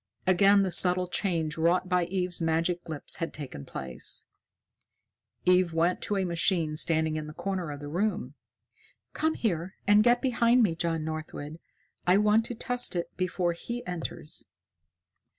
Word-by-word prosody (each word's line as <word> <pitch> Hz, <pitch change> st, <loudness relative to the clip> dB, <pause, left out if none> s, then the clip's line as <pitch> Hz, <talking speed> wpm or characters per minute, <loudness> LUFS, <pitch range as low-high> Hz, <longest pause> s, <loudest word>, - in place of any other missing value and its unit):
Again 195 Hz, +2 st, +5 dB
the 190 Hz, -, -1 dB
subtle 180 Hz, +1 st, +4 dB
change 165 Hz, -5 st, -1 dB
wrought 175 Hz, +3 st, +2 dB
by 180 Hz, -1 st, +2 dB
Eve's 180 Hz, -1 st, -1 dB
magic 165 Hz, +2 st, 0 dB
lips 155 Hz, -3 st, -3 dB
had 165 Hz, -, -3 dB
taken 130 Hz, -, -8 dB
place. 65 Hz, -1 st, -5 dB, 1.2 s
Eve 180 Hz, -1 st, +4 dB
went 170 Hz, +2 st, +1 dB
to 205 Hz, -, -1 dB
a 190 Hz, -, 0 dB
machine 170 Hz, -2 st, +1 dB
standing 160 Hz, 0 st, +1 dB
in 155 Hz, 0 st, -5 dB
a 155 Hz, -, -11 dB
corner 190 Hz, -4 st, -3 dB
of 145 Hz, -1 st, -6 dB
the 145 Hz, -, -6 dB
room. 200 Hz, +6 st, -2 dB, 0.8 s
"Come 315 Hz, +1 st, 0 dB
here 185 Hz, -3 st, -2 dB
and 205 Hz, +1 st, +5 dB
get 240 Hz, +1 st, +4 dB
behind 240 Hz, -1 st, +3 dB
me, 190 Hz, -6 st, +2 dB
John 165 Hz, -1 st, -1 dB
Northwood. 155 Hz, 0 st, -6 dB, 0.5 s
I 180 Hz, +2 st, +6 dB
want 210 Hz, +2 st, +3 dB
to 240 Hz, -, -4 dB
test 245 Hz, -2 st, 0 dB
it 175 Hz, -, -3 dB
before 180 Hz, -1 st, -1 dB
he 240 Hz, +8 st, -6 dB
enters." 170 Hz, -3 st, -4 dB
180 Hz, 155 wpm, -28 LUFS, 160-195 Hz, 1.2 s, I